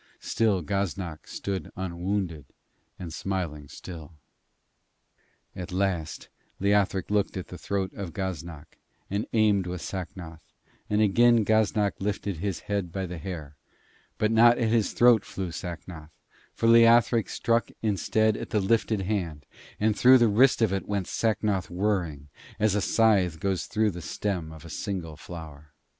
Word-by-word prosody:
Still 105 -6 +1
Gaznak 95 -2 -3
stood 95 -5 -4
unwounded 90 -3 -3 0.5
and 85 -3 -7
smiling 85 -6 -3
still. 80 +2 -10 1.4
At 90 -1 -6
last 90 -4 -2 0.3
Leothric 100 -1 +1
looked 105 -2 +1
at 95 - -6
the 90 - -8
throat 95 -1 -2
of 95 -4 -6
Gaznak 85 -4 -6 0.3
and 100 +2 -1
aimed 105 -4 +3
with 90 -1 -5
Sacnoth, 85 -3 -7 0.5
and 105 +1 +2
again 115 +2 +4
Gaznak 110 -1 +2
lifted 100 -2 -2
his 95 +1 -3
head 100 -4 -3
by 95 +1 -3
the 90 -1 -6
hair; 75 -4 -7 0.6
but 110 0 +1
not 120 +1 +6
at 115 -3 +1
his 115 -2 +1
throat 120 -3 +5
flew 95 -3 -5
Sacnoth, 85 -2 -7 0.5
for - - -2
Leothric 115 -1 +5
struck 115 0 0
instead 110 +1 +1
at - - -6
the 105 - +1
lifted 110 +1 +1
hand, 85 -8 -3 0.3
and 105 0 +2
through 130 +4 +7
the 120 -2 +4
wrist 115 +3 +4
of 105 -4 +2
it 95 - -3
went 100 -2 -1
Sacnoth 105 -3 0
whirring, 90 -7 -1 0.3
as 105 -2 +3
a 105 - +1
scythe 95 -6 +2
goes 95 -2 -1
through 110 -1 +1
the 85 -1 -8
stem 90 -2 -3
of 80 0 -12
a - - -9
single 85 -3 -4
flower. 75 -2 -10
95 Hz, 150 wpm, -27 LUFS, 85-105 Hz, 1.4 s, through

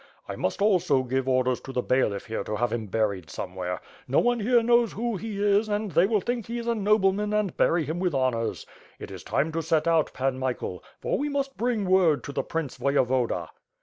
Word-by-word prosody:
I - - -5
must 200 - -1
also 175 -10 +3
give 130 +1 -1
orders 130 -1 +1
to 135 - -8
the 125 -2 -1
bailiff 115 -6 +1
here 110 -2 -3
to 105 - -3
have 120 +1 0
him 110 -2 -3
buried 100 -4 -1
somewhere. 90 -1 -5 0.3
No 135 - +1
one 245 0 +3
here 235 +2 +3
knows 235 -1 +3
who 235 +1 -2
he 215 +1 -5
is, 205 +1 +2
iind 205 -3 -2
they 170 +5 +5
will 210 -2 +1
think 240 +1 -3
he 235 +1 -4
is 235 - -4
a 235 - +1
nobleman 210 -1 +2
and 210 -4 0
bury 165 -2 +2
him 160 +4 -3
with 180 -5 0
honors. 125 -4 -1 0.3
It - - -9
is - - -8
time 155 +3 0
to 165 +1 -2
set 160 0 +1
out. 165 -2 +3
Pan 130 0 -1
Michael, 125 -8 -3 0.2
for - - -1
we 295 +1 -1
must 275 -1 -2
bring 235 -4 0
word 185 -5 +3
to - - -6
the - - -1
Prince 160 -5 -4
Voyevoda. 125 - +1
165 Hz, 220 wpm, -26 LUFS, 130-210 Hz, 0.3 s, they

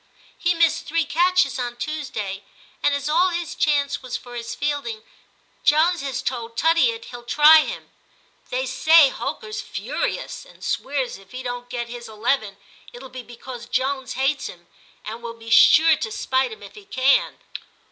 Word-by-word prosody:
* - - -27
He 350 0 +1
missed 330 0 +2
three 330 0 +1
catches 355 -4 +2
on 240 -1 -3
Tuesday, 240 -10 -4 0.4
and 285 - +2
as 285 0 -3
all 345 +5 +3
his 345 -2 -3
chance 285 -2 +1
was 255 -2 -4
for 245 - -13
his 235 0 -5
fielding, 280 -7 -3 0.6
Jones 325 +4 +3
has 270 -2 -3
told 235 -2 -4
Tuttiett 395 +9 +2
he'll 245 -1 -8
try 300 +5 +7
him. - - -7 0.6
They - - -1
say 320 -3 +6
Holker's 430 - -5
furious, - - -4
and - - -17
swears 265 -7 -2
if 195 +2 -19
he 255 +1 -6
don't 245 0 -5
get 240 -1 -4
his 240 0 -8
eleven, 220 -1 -1 0.3
it'll 255 +2 -11
be 255 0 -8
because 240 0 -10
Jones 260 +1 -1
hates 270 +2 0
him, 175 -1 -12 0.4
and 225 +2 -6
will 235 -1 -7
be 230 0 -10
sure 320 +6 +7
to 220 - -4
spite 260 - 0
him 440 - -10
if - - -11
he 420 -2 -13
can.' 270 -6 +2
265 Hz, 170 wpm, -22 LUFS, 240-320 Hz, 0.6 s, try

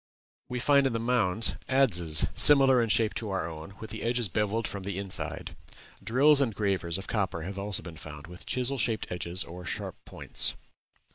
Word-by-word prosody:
We 125 - -3
find 140 +1 +4
in 130 - -2
the 115 - -1
mounds 115 -3 0 0.2
adzes 90 - +3
similar 135 -3 +7
in 115 - -1
shape 110 0 +2
to 110 - -5
our 95 -4 -2
own, 80 +4 -9
with 110 - -9
the 110 - -7
edges 120 -2 +1
bevelled 105 +4 -1
from 100 - -6
the 95 0 -5
inside. 100 -2 -4 0.5
Drills 140 +5 +4
and 115 -6 0
gravers 95 -5 -1
of 95 - -7
copper 95 -7 -2
have 100 +3 -6
also 100 -1 -3
been 85 -3 -10
found, 75 -1 -10
with 90 +1 -12
chisel 130 +1 -1
shaped 110 -2 -1
edges 90 +1 0
or 90 +2 -10
sharp 85 - -6
points. - - -2
105 Hz, 190 wpm, -28 LUFS, 90-120 Hz, 0.5 s, similar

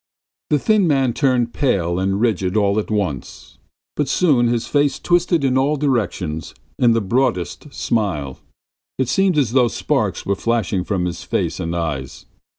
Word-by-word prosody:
The 150 - +3
thin 205 +5 +2
man 135 -5 +2
turned 125 -4 +1
pale 90 - 0
and 95 +1 0
rigid 105 -4 0
all 100 0 +2
at 105 - -4
once, 100 - -4 0.4
but 150 - 0
soon 140 -8 +3
his 115 -1 0
face 145 -1 +1
twisted 175 -2 +1
in 130 -1 +2
all 140 +3 +2
directions 105 - -2 0.2
in 120 -2 +4
the 115 - +1
broadest 120 - -1
smile; 90 - -2 0.6
it 130 - 0
seemed 190 +2 +2
as 130 -7 +2
though 125 -1 +4
sparks - - -1
were 100 - +1
flashing 105 -4 -1
from 95 -2 -1
his 85 -1 -4
face - - -2
and 85 +1 -3
eyes. 75 -5 -4
115 Hz, 160 wpm, -20 LUFS, 95-135 Hz, 0.6 s, in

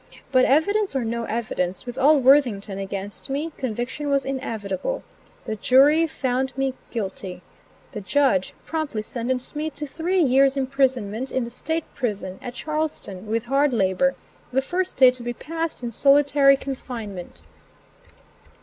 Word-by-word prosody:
But, 255 -1 +5
evidence 395 +6 +2
or 255 -3 0
no 230 +1 -2
evidence, 210 -5 -2
with 245 -1 -6
all 290 +3 +5
Worthington 240 -8 +3
against 195 +4 -6
me, 295 +4 -2
conviction 255 +4 -3
was 275 -1 +2
inevitable. 225 - -3 0.4
The 220 -3 -3
jury 285 +9 +5
found 260 -2 -2
me 270 -1 0 0.2
guilty. 190 -4 -5 0.5
The 210 - -6
judge 205 -2 +1
promptly 305 -9 -3
sentenced 250 +4 -3
me 305 +1 -1
to 300 0 -6
three 335 +6 -1
years' 270 0 +4
imprisonment 260 -3 0
in 260 - 0
the 235 - -6
State 320 +6 -2
Prison, 200 -7 -3
at 245 0 -7
Charlestown, 300 -12 -4
with 225 +1 0
hard 275 +2 +2
labor, 220 +6 +2 0.4
the 265 +1 +1
first 365 +5 -2
day 255 -2 +8
to 250 -1 -9
be 240 0 -3
passed 325 +1 -4
in 235 - -3
solitary 275 +2 +5
confinement. 225 - -7
260 Hz, 145 wpm, -24 LUFS, 220-285 Hz, 0.5 s, day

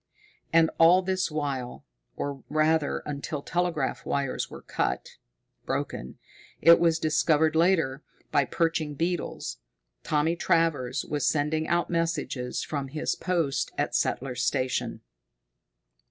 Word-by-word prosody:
And 165 -1 +5
all 175 +3 +7
this 185 0 0
while 140 -5 -4 0.3
or, 140 -1 -4
rather, 155 -1 +1
until 145 0 -4
the - - -12
telegraph 175 -6 0
wires 140 -2 -2
were - - -10
cut - - -2 0.5
broken, 65 - -3 0.4
it 170 +2 +7
was 165 -1 +3
discovered 155 0 +2
later, 160 -5 +2 0.3
by 140 - +3
perching 160 -1 -1
beetles 170 +4 -2 0.4
Thomas 155 +3 +1
Travers 150 -7 +1
was 145 -3 -1
sending 155 +1 +1
out 170 +1 +1
messages 165 -7 -1
from 140 -3 -3
his 150 +3 -2
post 170 -7 -1
at - - -1
Settler's 125 -1 -1
Station. 130 +1 -1
155 Hz, 120 wpm, -27 LUFS, 140-165 Hz, 0.5 s, all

